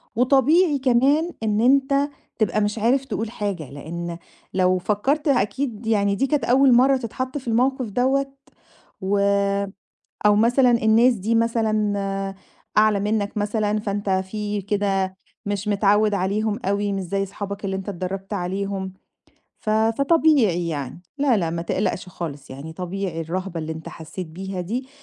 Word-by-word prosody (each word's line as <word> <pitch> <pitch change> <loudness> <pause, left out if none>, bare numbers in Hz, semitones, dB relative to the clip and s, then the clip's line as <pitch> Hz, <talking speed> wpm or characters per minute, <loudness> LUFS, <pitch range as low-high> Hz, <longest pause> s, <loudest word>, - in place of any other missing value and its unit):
وطبيعي 280 +5 +4
كمان 275 +7 +3
إن 210 0 +1
أنت 275 +3 +3 0.3
تبقى 215 0 +1
مش 210 +2 -1
عارف 260 +5 +2
تقول 225 -4 -3
حاجة، 195 - -4
لإن 170 +4 -6 0.4
لو 185 0 +3
فكّرت 265 - 0
أكيد 240 -1 0
يعني 200 -2 +2
دي 270 +6 +1
كانت 290 -5 0
أول 260 +1 +5
مرة 265 +3 +5
تتحط 255 +3 -4
في 260 - -9
الموقف 255 +2 +1
دوّة، 270 +5 +1 0.7
و 200 +1 +1 1.1
أو 210 - +5
مثلًا 245 +4 +4
الناس 235 +2 +4
دي 220 +2 -1
مثلًا 210 -4 0 0.4
أعلى 215 -1 +4
منك 205 0 -1
مثلًا، 210 0 0
فأنت 200 -1 -2
في 205 +2 -2
كده 195 -2 -1 0.3
مش 205 0 -2
متعود 205 +1 +3
عليهم 205 +3 0
أوي، 200 +1 0
مش 195 -1 -2
زي 195 +2 -2
أصحابك 200 +1 -6
اللي 190 -1 -1
أنت 190 +1 -7
اتدربت 195 +2 -5
عليهم، 190 0 -3 0.7
ف 215 - -3
فطبيعي 225 - +3
يعني. 145 +2 -5 0.2
لا، 275 -4 +3
لا، 170 -5 0
ما 170 0 -3
تقلقش 180 +1 -2
خالص، 145 -5 -7
يعني 140 +5 -8
طبيعي 180 -1 -4
الرهبة 180 +1 -4
اللي 160 0 -4
أنت 160 0 -8
حسّيت 165 +2 -7
بيها 190 +3 -5
دي 240 +9 -4
205 Hz, 145 wpm, -23 LUFS, 190-240 Hz, 1.1 s, أول